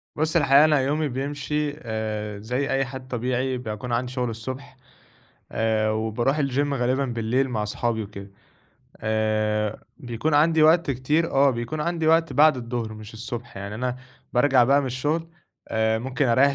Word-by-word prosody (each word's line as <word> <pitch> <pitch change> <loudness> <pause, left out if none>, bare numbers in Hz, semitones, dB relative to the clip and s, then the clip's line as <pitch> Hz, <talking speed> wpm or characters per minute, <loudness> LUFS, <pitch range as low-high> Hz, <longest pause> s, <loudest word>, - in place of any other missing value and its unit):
بُص 155 +2 -1
الحقيقة 145 -1 +6
أنا 150 -2 +4
يومي 150 +3 0
بيمشي، 145 +2 -2
آآ 110 -4 -4
زي 125 +6 -2
أي 135 0 +1
حد 130 0 -8
طبيعي، 125 +1 -1
باكون 110 0 -5
عندي 125 +1 -1
شغل 125 -2 -1
الصُبح، 130 +4 -7 0.7
آآ 110 -1 +1
وباروح 110 +6 0
الGym 140 +1 0
غالبًا 130 +1 +1
بالليل 120 +2 0
مع 110 -3 -1
صحابي 110 +1 -1
وكده. 100 -1 -10 0.7
آآ 110 -1 0
بيكون 125 +5 -2
عندي 155 +1 +4
وقت 160 -1 +5
كتير، 150 +6 0
آه 140 +1 +4
بيكون 125 +5 -4
عندي 165 0 -1
وقت 165 -2 +3
بعد 150 +1 +5
الضُهر 115 -2 -4
مش 110 +1 -11
الصُبح 120 -1 -7
يعني 100 +2 -6
أنا، 125 +2 -2 0.4
بارجَع 125 0 +4
بقى 140 +3 +4
من 135 - -3
الشغل، 150 +6 -1 0.4
آآ 110 0 +1
ممكن 130 +3 -1
أريّح 130 +4 +4
125 Hz, 160 wpm, -24 LUFS, 110-140 Hz, 0.7 s, الحقيقة